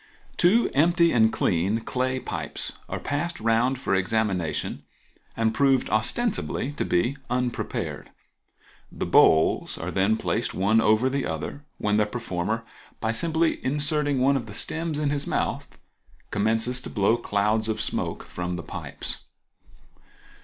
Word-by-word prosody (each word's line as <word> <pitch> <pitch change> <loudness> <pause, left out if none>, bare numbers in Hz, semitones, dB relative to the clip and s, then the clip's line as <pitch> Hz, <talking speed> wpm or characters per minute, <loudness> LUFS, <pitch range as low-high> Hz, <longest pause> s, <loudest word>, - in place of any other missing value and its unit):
—Two 210 +7 +4
empty 170 +3 +4
and 110 -2 +4
clean 95 +5 +1
clay 130 +2 -1
pipes - - -4 0.2
are - - -3
passed 170 +5 -2
round 115 +4 +2
for 125 - -1
examination 95 -3 0 0.6
and 115 0 +2
proved 135 -1 +2
ostensibly 140 - 0
to 145 - -3
be 120 +11 +1
unprepared. 125 -1 -2 0.8
The - - -4
bowls 80 0 +4
are - - -4
then 100 +4 +2
placed 115 +1 -1
one 105 +4 +3
over 110 +3 +3
the 135 +1 -1
other, 80 - -5
when 105 0 +1
the 105 -1 +3
performer, 110 -1 -3 0.4
by 110 - 0
simply 160 +7 +1
inserting 145 0 0
one 135 +2 +4
of 120 -4 -2
the 105 - -8
stems 160 +5 -2
in 150 -1 0
his 145 -1 -1
mouth, - - -2 0.5
commences 115 +4 +1
to - - -7
blow 105 +2 +2
clouds 110 -1 0
of 110 0 -1
smoke - - -2
from 90 0 -4
the 85 - -5
pipes. - - -5
115 Hz, 140 wpm, -25 LUFS, 105-140 Hz, 0.8 s, Two